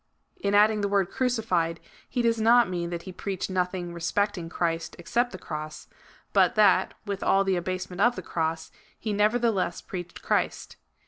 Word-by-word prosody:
In 200 - 0
adding 210 +1 +5
the 200 - +1
word 200 -2 +1
crucified, 200 -10 0 0.3
he 245 -2 -1
does 230 -1 +2
not 235 +2 +6
mean 175 -2 -3
that 170 -1 -5
he 185 - -7
preached 190 +1 -4
nothing 180 -1 -2
respecting 175 +1 -1
Christ 165 -1 -2
except 235 +9 0
the 185 - -7
cross; 155 -2 -7 0.5
but 240 - +4
that, 200 -3 +4
with 200 -2 -4
all 195 0 +3
the 195 -1 +1
abasement 185 +1 -3
of 240 +2 +4
the - - -6
cross, 160 -1 -2 0.3
he 215 -1 -3
neverthelesa 210 -3 +1
preached 175 -2 -7
Christ. - - -1
190 Hz, 170 wpm, -27 LUFS, 175-215 Hz, 0.5 s, not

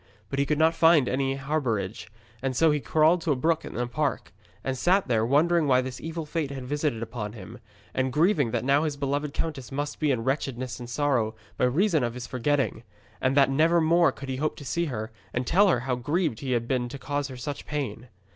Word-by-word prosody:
But 140 - -1
he 140 - +1
could 150 - +1
not 160 +1 +4
find 165 -5 +5
any 135 +1 0
harbourage, 130 -10 -2 0.3
and 130 -1 -2
so 160 +4 +4
he 150 - +1
crawled 160 +4 +3
to 160 - 0
a - - +3
brook 160 +5 +1
in - - -7
a 125 - 0
park, 140 0 -2 0.3
and 135 - -1
sat 180 +8 +2
there 115 -3 +2
wondering 155 +6 +3
why 130 -1 +4
this 130 0 -6
evil 165 0 -4
fate 150 -1 -2
had 140 -1 -6
been - - -8
visited 145 -4 -1
upon 110 -2 -5
him, 100 -5 -10 0.3
and 130 0 0
grieving 150 - +3
that 115 - -2
now 140 +2 +4
his 150 -3 -2
beloved 140 +1 -1
countess 140 -6 -4
must 145 +2 -3
be 155 - +1
in 125 -4 +1
wretchedness 130 -2 -2
and 120 -1 -8
sorrow 120 -5 0 0.2
by - - +2
reason 160 +3 +2
of 120 0 -2
his 125 -1 -6
forgetting, 130 -2 0 0.4
and 130 +2 +1
that 135 -1 +5
never 165 +5 +4
more 170 +1 +4
could 135 - -9
he 130 - -2
hope 155 +3 -1
to 145 - -10
see 170 +5 0
her 110 -7 -4 0.2
and 125 +1 0
tell 200 +10 +4
her 145 -10 +2
how 130 0 -1
grieved 145 +1 -1
he 130 -2 -2
had 120 -1 -1
been 125 -1 0
to 140 - -7
cause 145 +1 -2
her 130 -2 -9
such 140 +4 -6
pain. 125 -5 -4
140 Hz, 230 wpm, -26 LUFS, 125-155 Hz, 0.4 s, find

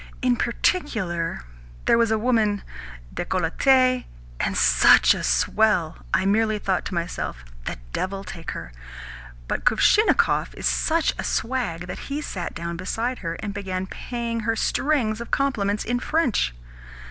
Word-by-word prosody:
In 250 -1 +3
particular, 220 - -1 0.4
there - - +5
was 230 -1 +3
a 220 - +2
woman 215 -3 +1 0.5
decolletee, 255 - +2 0.3
and - - -1
such - - +6
a - - -4
swell! 165 - +2
I 190 - +2
merely 215 +2 +2
thought 190 -3 -1
to 190 - -4
myself, 170 - -4 0.2
'The - - -4 0.2
devil 195 +1 -3
take 175 -3 -8
her!' 60 - -6 0.8
but - - -2
Kuvshinnikov 430 +2 +3
is - - -5
such 330 0 +2
a - - 0
wag 205 -10 -2
that 180 - -6
he 280 +1 -2
sat 185 - -5
down 170 0 -4
beside 230 +7 -2
her, 165 -2 -4
and 205 -2 -4
began 190 -2 -3
paying 235 +3 -4
her 225 +1 0
strings 235 -4 0
of 235 - -7
compliments 210 -7 0
in 245 +1 0
French. 255 - 0
215 Hz, 145 wpm, -24 LUFS, 180-245 Hz, 0.8 s, such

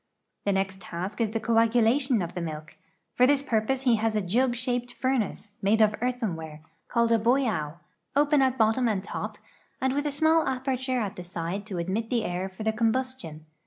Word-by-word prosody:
The 200 - +2
next 190 0 -1
task 185 +5 -5
is 225 - +2
the 225 +1 -2
coagulation 230 +1 +3
of 170 - -6
the 175 - -4
milk. 155 -2 -6 0.4
For 250 - +5
this 285 0 +3
purpose 255 +2 0
he 245 -4 +4
has 220 0 0
a 210 - +2
jug 240 +7 +1
shaped 245 0 -2
furnace, 225 -6 -1
made 205 +3 +3
of 215 -1 +5
earthenware, 175 -12 -3 0.3
called 235 -1 +1
a 230 - +4
boido, 225 - +1 0.4
open 290 0 +4
at 260 -1 +2
bottom 225 +3 +3
and 200 -4 0
top, - - -5 0.4
and 260 0 +1
with 290 +2 0
a - - -1
small 315 +2 +3
aperture 260 -1 -1
at 205 -4 -3
the 180 - -6
side 175 +3 -4
to 195 -4 -5
admit 190 +7 -2
the 235 -3 +1
air 180 +2 -2
for 190 +3 -8
the 220 0 +1
combustion. 225 -9 -2
225 Hz, 195 wpm, -27 LUFS, 190-255 Hz, 0.4 s, For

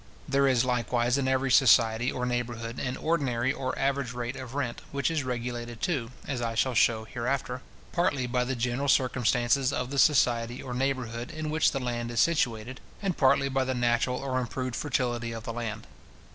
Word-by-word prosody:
There 140 0 +3
is 130 -2 +3
likewise 120 +1 +1
in 135 - 0
every 130 0 +1
society 120 -3 +5
or 125 - -2
neighbourhood 120 -1 -3
an 125 0 -3
ordinary 135 -6 0
or 130 -2 -3
average 135 -2 0
rate 120 +1 -4
of 130 -1 -8
rent, 125 -5 -2
which 140 +3 0
is 155 -3 0
regulated, 120 -2 -4
too, 135 -8 -1 0.2
as 135 -4 -2
I 115 -1 -2
shall 130 +3 +1
shew 110 0 +3
hereafter, 125 +1 -2 0.3
partly 145 -7 +1
by 125 0 0
the 130 +1 -2
general 125 +4 -1
circumstances 125 0 +2
of 125 -1 -3
the 140 - 0
society 120 -4 +3
or 125 - -6
neighbourhood 125 -2 -2
in 155 -1 -4
which 155 0 +3
the 135 - -2
land 120 -2 -3
is 120 -1 -2
situated, 125 -6 +1 0.2
and 195 -4 -1
partly 140 0 +3
by 135 -1 0
the 130 0 -2
natural 120 +1 +1
or 130 -1 -1
improved 125 +1 -3
fertility 120 -4 -1
of 115 -1 -6
the 115 - -5
land. 110 -2 -5
125 Hz, 185 wpm, -28 LUFS, 120-135 Hz, 0.3 s, society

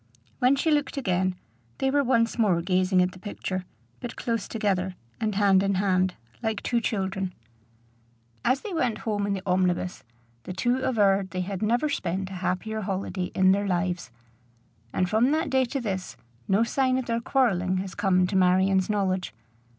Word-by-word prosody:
When 255 +2 +4
she 310 +4 +1
looked 290 -1 0
again, 185 -6 0 0.4
they 265 - +1
were 285 0 +3
once 235 -2 +1
more 195 -7 +3
gazing 185 0 +3
at 180 - -1
the 185 - -13
picture, 185 -2 -4 0.3
but 245 - -6
close 230 -4 -2
together, 190 -4 -1 0.2
and 215 -3 -1
hand 195 -2 +4
in 200 0 +1
hand, 185 -1 +1 0.3
like 220 -2 -2
two 235 -1 +1
children. 190 -3 -2 1.1
As 265 +2 +2
they 420 - -6
went 250 -9 0
home 205 -2 0
in 200 - 0
the 190 -1 -4
omnibus, 180 -1 0 0.4
the 185 - -7
two 240 +7 +1
averred 200 -7 +2
they 185 -1 -3
had 190 0 -4
never 240 +7 +2
spent 190 - -2
a 185 -1 -7
happier 215 +5 -2
holiday 190 -1 -2
in 185 0 +5
their 200 +1 +1
lives; 180 -4 -1 0.8
and 185 - +1
from 220 +6 +3
that 315 - 0
day 265 -1 +3
to 275 +3 -3
this 190 -6 -4 0.3
no 200 +4 +3
sign 255 +2 +1
of 260 - -2
their 230 0 -1
quarrelling 190 -9 +1
has 185 -1 -4
come 190 -3 +2
to 190 - -3
Marion's 190 +1 +3
knowledge. 190 - -1
195 Hz, 175 wpm, -26 LUFS, 185-230 Hz, 1.1 s, in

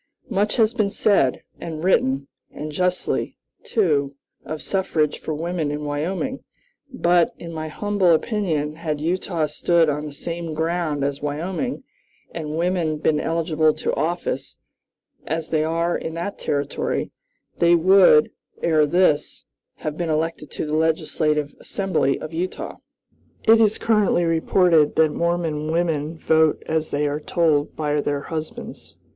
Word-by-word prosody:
"Much 205 +2 +1
has 225 -1 +3
been 215 -5 +1
said 195 -11 +2 0.2
and 160 -1 -6
written, 135 -7 +2 0.2
and 150 +1 -7
justly, 180 +3 -1 0.2
too, 145 - +1 0.3
of 155 0 -5
suffrage 165 -6 0
for - - -5
women 165 -1 -2
in 150 +1 -4
Wyoming; 180 - -3 0.5
but, 175 -8 +2
in 170 -1 -8
my 155 0 -4
humble 200 +3 0
opinion, 160 -5 0
had 155 -3 -3
Utah 170 0 -1
stood 165 +2 +2
on 150 +1 -2
the - - -7
same 165 +2 -5
ground 160 -2 -1
as 140 0 -2
Wyoming, 175 - -3 0.5
and 155 -2 -4
women 170 -3 0
been 150 0 +1
eligible 160 -1 +1
to - - -2
office, 160 -5 -2 0.7
as 160 0 -3
they 155 -1 +2
are 165 +2 0
in 160 - -4
that 175 +4 -4
Territory, 140 -1 -2 0.5
they 170 0 +5
would, 180 -3 +6 0.3
ere 155 -3 +3
this, 155 -2 +1 0.4
have 155 0 -2
been 170 -2 -2
elected 155 0 -1
to - - -4
the 150 - -4
legislative 155 -2 0
Assembly 175 -8 0
of 155 - -7
Utah. 180 +3 -4 0.7
"It 225 +1 +6
is 215 -1 +3
currently 210 -5 +2
reported 165 -1 +3
that 160 -1 +4
Mormon 165 -2 -1
women 165 -2 -1
vote 160 -1 +2
as 160 0 -1
they 145 +1 0
are 145 +1 -1
told 155 -2 +1
by 150 -1 0
their 145 -1 -1
husbands. 155 +1 -7
160 Hz, 140 wpm, -22 LUFS, 150-175 Hz, 0.7 s, would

